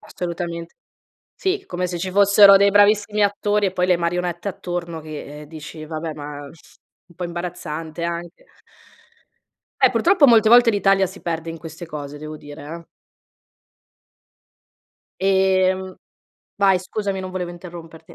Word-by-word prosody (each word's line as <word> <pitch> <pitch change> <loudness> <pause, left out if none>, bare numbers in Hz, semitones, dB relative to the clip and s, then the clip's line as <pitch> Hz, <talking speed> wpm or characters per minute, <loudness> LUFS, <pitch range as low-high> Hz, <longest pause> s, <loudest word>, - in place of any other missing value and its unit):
Assolutamente. 170 -1 -6 0.6
Sì, 385 +1 -2
come 180 0 -3
se 175 - -4
ci 185 +2 -4
fossero 200 0 +7
dei 200 +1 +4
bravissimi 205 +1 +3
attori 205 0 +1
e - - -2
poi 180 0 0
le 180 - +4
marionette 175 +1 -2
attorno 175 -3 -5
che, 150 -1 -9
eh, 150 - -12
dici: 155 0 -9
"Vabbè, 155 0 -5
ma 145 -1 -8
un 165 +3 -20
po' 180 - -6
imbarazzante 170 -2 -5
anche". 170 +1 -5 1.4
Eh - - +6
purtroppo 350 -5 +4
molte 230 -3 +6
volte 240 +1 +7
l'Italia 195 -2 +3
si 190 +2 -12
perde 165 -1 -3
in 165 - -8
queste 165 +2 -9
cose, 150 -2 -7
devo 155 +1 -8
dire, 145 -1 -11
eh. 165 +3 -8 2.4
Ehm 190 -1 +2 0.6
vai 195 -2 +4
scusami, 195 +1 -3
non 185 0 -6
volevo 180 -1 -4
interromperti. 170 -2 -11
175 Hz, 140 wpm, -21 LUFS, 165-195 Hz, 2.4 s, fossero